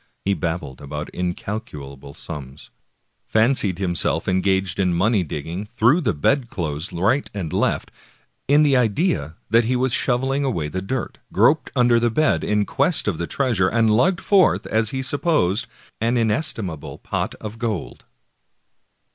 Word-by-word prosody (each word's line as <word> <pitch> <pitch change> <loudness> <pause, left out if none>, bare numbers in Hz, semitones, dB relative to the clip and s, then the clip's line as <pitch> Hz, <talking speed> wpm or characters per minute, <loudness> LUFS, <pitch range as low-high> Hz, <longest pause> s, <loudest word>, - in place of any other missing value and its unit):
He 100 - +2
babbled 85 -7 -4
about 75 +1 -6
incalculable 75 - -6
sums, 70 0 -9 0.6
fancied 110 -5 +2
himself 85 -3 0
engaged 95 0 +1
in 90 -3 +2
money 100 +2 +2
digging, 80 +5 -5
threw 120 - +3
the 110 - 0
bedclothes 85 - -1
right 110 +11 +1
and 85 -6 -4
left, - - 0 0.6
in 145 +2 +5
the 140 -3 +4
idea 115 - +1 0.2
that 115 0 +4
he 125 +2 +1
was 125 -1 0
shoveling 135 +2 +1
away 85 - -1
the 95 +4 -4
dirt, 125 +5 -4
groped - - +3
under 120 -1 +4
the 120 0 +2
bed 155 +7 +1
in 105 0 +1
quest 140 - +1
of 95 -6 -1
the 85 - -2
treasure, 115 -9 +1
and 110 0 +2
lugged 175 - +2
forth, 195 -3 +3
as 110 -1 +1
he 130 +2 -3
supposed, 130 - +1 0.3
an 115 +2 +1
inestimable 110 - -1
pot - - -3
of 110 +1 -8
gold. 110 -6 -4
105 Hz, 145 wpm, -22 LUFS, 85-125 Hz, 0.6 s, in